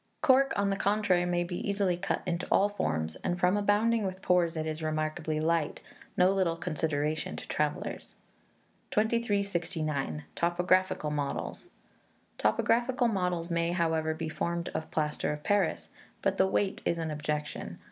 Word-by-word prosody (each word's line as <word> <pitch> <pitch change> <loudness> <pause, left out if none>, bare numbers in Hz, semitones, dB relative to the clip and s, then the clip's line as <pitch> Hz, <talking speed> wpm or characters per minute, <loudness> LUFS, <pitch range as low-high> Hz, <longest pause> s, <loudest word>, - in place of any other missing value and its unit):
Cork, 270 0 +5
on 200 0 +1
the 195 - 0
contrary, 195 -3 +2
may 175 0 +1
be 175 0 -4
easily 200 -3 +1
cut 180 +3 -2
into 175 -1 -2
all 205 - +4
forms, 80 - -2
and 175 0 -2
from 180 +2 +3
abounding 210 +2 +2
with 190 -1 -4
pores, 175 -2 +2
it 155 - -1
is 155 0 -3
remarkably 155 0 -1
light 160 -1 0 0.4
no 180 +1 +5
little 185 -4 +1
consideration 155 -2 -1
to - - -8
travellers. - - -2 0.7
2369. 190 - 0
Topographical 175 -2 +1
Models. 145 -2 -3 0.7
Topographical 235 - +2
models 180 -4 -1
may, 170 0 +1
however, 160 -2 +1
be 160 0 -4
formed 170 +2 -2
of 160 - -4
plaster 150 -1 -1
of 150 0 -5
Paris, 205 -4 +1 0.3
but - - +1
the - - +5
weight 105 0 0
is 170 - 0
an 160 -1 -2
objection. 150 0 -3
170 Hz, 145 wpm, -30 LUFS, 155-195 Hz, 0.7 s, Cork